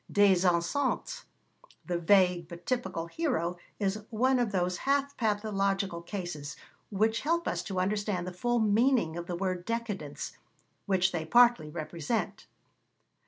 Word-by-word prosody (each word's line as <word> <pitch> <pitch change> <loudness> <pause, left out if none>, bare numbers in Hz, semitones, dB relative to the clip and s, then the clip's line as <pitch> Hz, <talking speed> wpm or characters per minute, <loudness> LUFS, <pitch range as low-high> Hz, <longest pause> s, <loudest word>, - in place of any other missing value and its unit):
Des 195 -3 +4
Esseintes, 180 +11 0 0.6
the 175 -1 -1
vague 180 -1 +3
but 170 0 -11
typical 190 -10 -2
hero, 180 - -1 0.2
is 205 +1 -1
one 255 +3 +2
of 240 -4 0
those 180 -2 0
half 280 0 0
pathological 200 -4 0
cases 170 -5 -6 0.3
which 220 +2 +1
help 335 +3 0
us - - -1
to 190 -3 -3
understand 200 -1 -1
the 180 - -5
full 240 +7 0
meaning 220 -4 +3
of 170 0 -5
the 175 - -3
word 185 -1 -2
décadence, 210 -9 -4 0.6
which 190 -1 +2
they 165 -2 -2
partly 235 -3 +4
represent. 165 +6 -3
195 Hz, 135 wpm, -30 LUFS, 175-230 Hz, 0.6 s, Des